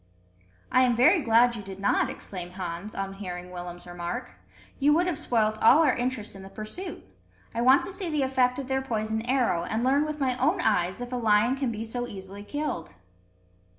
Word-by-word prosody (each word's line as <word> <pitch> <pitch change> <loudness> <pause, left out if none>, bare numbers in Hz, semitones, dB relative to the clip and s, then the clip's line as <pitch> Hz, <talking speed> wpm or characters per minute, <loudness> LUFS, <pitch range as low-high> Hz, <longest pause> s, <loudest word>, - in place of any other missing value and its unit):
"I 255 - +5
am 245 -2 +3
very 310 +9 +5
glad 240 -1 +4
you 215 - -5
did 195 -1 -9
not," 200 - +2
exclaimed 180 -2 -7
Hans, 185 +2 -6
on 195 0 -3
hearing 180 -2 -7
Willem's 175 -1 -8
remark. 175 - -5 0.5
"You 290 +2 +4
would 345 +2 +3
have 345 -5 -1
spoilt 220 -7 +1
all 290 +8 +7
our 285 - +3
interest 245 -4 -3
in 195 - -10
the 190 - -10
pursuit. 215 - -6 0.5
I 230 - -1
want 260 +3 +6
to - - -4
see 375 -2 -3
the 300 -3 +1
effect 255 -1 +2
of 275 - -4
their 265 0 0
poisoned 220 -2 -2
arrow, 245 -10 +2
and 220 +6 -2
learn 275 +3 +3
with 305 0 -4
my 260 -3 +1
own 315 +9 +2
eyes 190 - +1
if 245 +1 -6
a - - 0
lion 225 +2 +3
can 270 -3 -1
be 225 0 -5
so 245 +2 -3
easily 195 -1 -9
killed." 210 - -4
235 Hz, 205 wpm, -27 LUFS, 195-265 Hz, 0.5 s, all